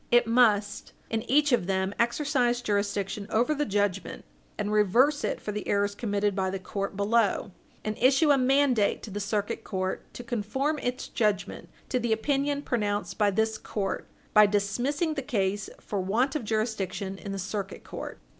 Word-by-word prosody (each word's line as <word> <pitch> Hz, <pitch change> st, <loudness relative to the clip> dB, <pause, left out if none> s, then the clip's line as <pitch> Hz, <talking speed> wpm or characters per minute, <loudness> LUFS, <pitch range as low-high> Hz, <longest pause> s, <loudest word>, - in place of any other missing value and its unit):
It 240 Hz, 0 st, +5 dB
must, 215 Hz, -3 st, +2 dB, 0.2 s
in 225 Hz, -1 st, 0 dB
each 290 Hz, +2 st, +4 dB
of 235 Hz, -8 st, +2 dB
them, 190 Hz, 0 st, 0 dB
exercise 245 Hz, 0 st, +1 dB
jurisdiction 200 Hz, -1 st, -1 dB
over 240 Hz, +7 st, +2 dB
the 295 Hz, 0 st, -1 dB
judgment, 200 Hz, -2 st, -1 dB, 0.3 s
and 205 Hz, -, -2 dB
reverse 235 Hz, +8 st, +3 dB
it -, -, -1 dB
for 210 Hz, -, -4 dB
the 210 Hz, 0 st, -5 dB
errors 200 Hz, 0 st, +1 dB
committed 205 Hz, -2 st, -1 dB
by 190 Hz, -1 st, 0 dB
the 195 Hz, -, -2 dB
court 195 Hz, +1 st, -4 dB
below; 205 Hz, -1 st, +1 dB, 0.3 s
and 215 Hz, 0 st, -1 dB
issue 270 Hz, +5 st, +5 dB
a 280 Hz, -, +5 dB
mandate 255 Hz, -4 st, +3 dB
to 215 Hz, -, -7 dB
the 205 Hz, -, -4 dB
Circuit 205 Hz, +2 st, -2 dB
Court 185 Hz, -2 st, -3 dB
to 245 Hz, -, -7 dB
conform 245 Hz, +6 st, -1 dB
its 250 Hz, +1 st, -3 dB
judgment 210 Hz, -5 st, -1 dB, 0.2 s
to 255 Hz, -, +1 dB
the 235 Hz, -2 st, +1 dB
opinion 285 Hz, +5 st, 0 dB
pronounced 210 Hz, -5 st, -2 dB
by 210 Hz, -1 st, +4 dB
this 220 Hz, +2 st, 0 dB
court, 195 Hz, -3 st, -3 dB, 0.3 s
by 210 Hz, -1 st, +8 dB
dismissing 245 Hz, -, 0 dB
the 285 Hz, -, -3 dB
case 205 Hz, -5 st, -1 dB
for 205 Hz, -, -4 dB
want 235 Hz, +9 st, +1 dB
of 280 Hz, -7 st, -2 dB
jurisdiction 205 Hz, -3 st, -2 dB
in 200 Hz, -, -6 dB
the 195 Hz, -, -3 dB
Circuit 195 Hz, +1 st, -4 dB
Court. -, -, -7 dB
215 Hz, 175 wpm, -28 LUFS, 200-250 Hz, 0.3 s, by